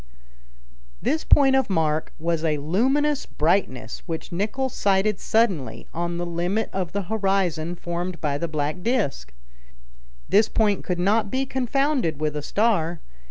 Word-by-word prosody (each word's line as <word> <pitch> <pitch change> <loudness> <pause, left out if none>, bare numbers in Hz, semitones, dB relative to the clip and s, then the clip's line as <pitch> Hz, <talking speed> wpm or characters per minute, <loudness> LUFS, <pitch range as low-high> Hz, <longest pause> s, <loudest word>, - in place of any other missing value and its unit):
This 315 +1 0
point 270 -2 +5
of 265 -4 +2
mark 160 -4 0
was 165 0 -1
a 155 -2 +1
luminous 265 - +1
brightness, 150 - 0
which 165 +1 -5
Nicholl 210 +9 -1
sighted 200 -2 +1
suddenly, 165 - 0
on 170 +1 -2
the 175 - -2
limit 175 +6 -1
of 185 -3 -2
the 200 0 -2
horizon 190 -5 0
formed 175 +1 -4
by 145 -2 -1
the 170 - -1
black 155 +2 -2
disc. 195 - -1 1.0
This 210 +2 +4
point 210 -3 +1
could 180 - -2
not 205 +4 +2
be 265 +5 0
confounded 265 - 0
with 150 -1 -1
a 150 - -2
star. 175 -3 +1
180 Hz, 145 wpm, -24 LUFS, 160-220 Hz, 1.0 s, point